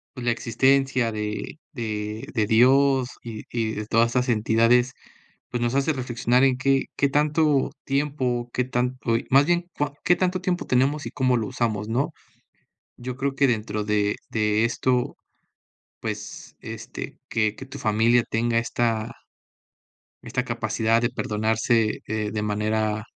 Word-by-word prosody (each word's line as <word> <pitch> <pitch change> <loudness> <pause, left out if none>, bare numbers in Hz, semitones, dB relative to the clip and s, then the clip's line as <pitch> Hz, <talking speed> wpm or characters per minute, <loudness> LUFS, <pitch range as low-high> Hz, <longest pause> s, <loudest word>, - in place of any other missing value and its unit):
pues, 125 -2 -6
la 120 - +2
existencia 130 +1 +2
de 105 +7 -4
de 110 -3 -4
de 110 -2 +2
Dios, 130 +3 +4
y 110 -2 -7
y 115 -2 -1
de 105 0 -5
todas 115 +1 +3
esas 125 +1 0
entidades, 115 +2 +3 0.6
pues, 120 0 -3
nos 120 +2 0
hace 140 +3 +2
reflexionar 125 -1 +1
en 130 -2 +3
qué 135 +1 +2
qué 140 - +2
tanto 150 0 +2
tiempo, 135 -4 -1
qué 125 - +1
tanto 125 -1 -1 0.2
más 135 +2 +6
bien, 175 +1 +1
cuan 145 -1 -1
qué 180 - +4
tanto 185 0 0
tiempo 180 -1 -1
tenemos 135 +4 +1
y - - -5
cómo 130 -3 +2
lo 110 - -2
usamos, 110 -3 -2
¿no? 125 +5 0 0.9
Yo 125 0 -5
creo 135 0 -1
que 140 0 +4
dentro 110 -2 -1
de 105 -1 +1
de 110 0 +2
esto, 125 +1 0 0.8
pues, - - -6
este, - - -7
que 110 -2 +1
que 135 - -9
tu 135 +2 -9
familia 115 +3 +3
tenga 115 +1 +1
esta 115 -1 -1 1.1
esta - - -2
capacidad 115 +1 +1
de 120 - +1
perdonarse, 110 +1 0
eh, 110 -1 -2
de 105 - -2
manera 105 0 -1
120 Hz, 150 wpm, -24 LUFS, 110-135 Hz, 1.1 s, más